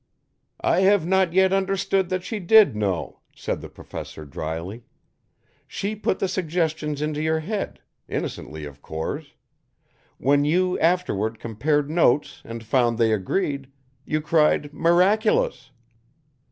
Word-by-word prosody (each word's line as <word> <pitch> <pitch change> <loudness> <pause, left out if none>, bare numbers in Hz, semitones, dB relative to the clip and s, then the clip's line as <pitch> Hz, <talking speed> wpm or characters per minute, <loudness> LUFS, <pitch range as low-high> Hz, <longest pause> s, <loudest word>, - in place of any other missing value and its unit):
"I - - +3
have 190 -2 +4
not 190 -1 +2
yet 190 +1 +4
understood 195 -1 +1
that 185 -1 -2
she 215 +2 -4
did 200 - +6
know," 100 -5 -2 0.2
said - - -3
the - - -9
Professor 80 - -9
dryly. 80 - -5 0.9
"She 205 +2 -3
put 205 -2 -1
the 195 - 0
suggestions 155 -4 -1
into 150 0 -2
your 160 0 +1
head; 200 +5 -4 0.3
innocently, 75 0 -5
of 70 -1 -11
course. 80 0 -5 0.8
When 145 +2 +3
you 180 +5 +1
afterward 135 - +1
compared 140 +6 0
notes 150 -4 +2
and 115 0 -7
found 120 0 +2
they 115 -2 +3
agreed, 140 - -2 0.3
you 155 +2 -1
cried 150 -2 +2
'miraculous'! 175 - +2
155 Hz, 125 wpm, -24 LUFS, 115-185 Hz, 0.9 s, did